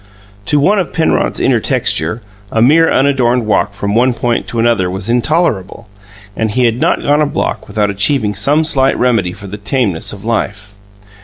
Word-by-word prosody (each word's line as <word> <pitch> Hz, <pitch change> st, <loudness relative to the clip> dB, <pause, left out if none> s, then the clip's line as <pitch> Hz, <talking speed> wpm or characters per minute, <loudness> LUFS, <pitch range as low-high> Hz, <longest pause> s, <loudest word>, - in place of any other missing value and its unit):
To 150 Hz, -, +2 dB
one 200 Hz, +8 st, +2 dB
of 180 Hz, -, -3 dB
Penrod's 160 Hz, -, 0 dB
inner -, -, +2 dB
texture, 85 Hz, +9 st, -1 dB, 0.3 s
a 115 Hz, -, 0 dB
mere 155 Hz, +8 st, +4 dB
unadorned 125 Hz, -3 st, +1 dB
walk 105 Hz, -1 st, 0 dB
from 100 Hz, +1 st, -3 dB
one 120 Hz, +2 st, +2 dB
point 120 Hz, 0 st, -1 dB
to 120 Hz, -, -6 dB
another 115 Hz, -5 st, +1 dB
was 95 Hz, +4 st, -3 dB
intolerable, 120 Hz, -, -1 dB, 0.5 s
and 110 Hz, 0 st, -1 dB
he 125 Hz, +4 st, +1 dB
had 115 Hz, +1 st, 0 dB
not -, -, 0 dB
gone 145 Hz, +1 st, +2 dB
a 150 Hz, -, +2 dB
block -, -, -3 dB
without 105 Hz, 0 st, -1 dB
achieving 105 Hz, +2 st, 0 dB
some 140 Hz, +11 st, +1 dB
slight 135 Hz, -4 st, +2 dB
remedy 115 Hz, -8 st, +1 dB
for 100 Hz, -, -11 dB
the 100 Hz, +2 st, -7 dB
tameness 100 Hz, -5 st, -1 dB
of 100 Hz, +1 st, -10 dB
life. 105 Hz, -3 st, -3 dB
115 Hz, 180 wpm, -14 LUFS, 100-135 Hz, 0.5 s, mere